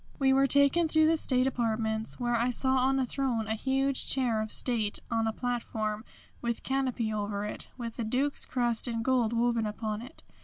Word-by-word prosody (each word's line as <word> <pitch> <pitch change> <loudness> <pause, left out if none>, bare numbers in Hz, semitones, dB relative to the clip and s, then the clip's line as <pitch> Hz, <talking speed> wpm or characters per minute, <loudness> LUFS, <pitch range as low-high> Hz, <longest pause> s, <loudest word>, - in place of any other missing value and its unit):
We 265 -1 +3
were 270 +1 +4
taken 280 +5 +5
through 315 0 +3
the 325 +1 +4
state 255 -5 +1
apartments 220 -3 -1
where 240 -1 0
I 235 +2 +1
saw 260 +2 +2
on 265 +1 +2
a 265 - +1
throne 245 -3 -1
a 220 - -1
huge 270 +4 0
chair 245 -5 +1
of 215 0 -5
state 220 -5 0
on 225 -1 +1
a - - +1
platform, 220 -3 -3 0.4
with 235 -1 -3
canopy 255 -5 -1
over 205 -1 -3
it, 210 - -4
with 235 -2 -6
the 235 - -2
Duke's 260 +6 0
crest 240 -2 +1
in 230 -1 -2
gold 245 -3 +2
woven 235 -1 +1
upon 215 0 -4
it. 250 +3 -12
240 Hz, 195 wpm, -29 LUFS, 220-265 Hz, 0.4 s, taken